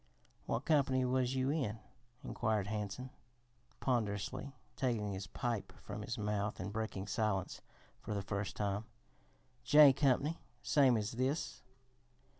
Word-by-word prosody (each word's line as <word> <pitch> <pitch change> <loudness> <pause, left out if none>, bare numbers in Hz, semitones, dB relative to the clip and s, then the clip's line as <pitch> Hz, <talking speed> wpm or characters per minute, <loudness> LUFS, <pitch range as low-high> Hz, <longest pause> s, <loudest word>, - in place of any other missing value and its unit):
"What - - -1
company 135 -4 +3
was 130 0 +1
you 130 +1 +1
in?" 130 -9 -1 0.5
inquired 110 -4 0
Hansen, 105 +4 -4 0.7
ponderously 125 +3 -1 0.2
taking 115 -6 0
his 95 +1 -5
pipe 120 -3 -2
from - - -6
his - - -4
mouth 105 0 -1
and 100 +2 -4
breaking 110 -3 -3
silence 100 -2 -1 0.4
for 105 - -4
the 100 - -2
first 100 0 -3
time. 100 +1 -1 0.8
"J 150 -2 +8
Company, 140 +3 +2 0.2
same 135 -5 +5
as 105 0 -2
this." 130 +6 -1
115 Hz, 125 wpm, -35 LUFS, 105-130 Hz, 0.8 s, J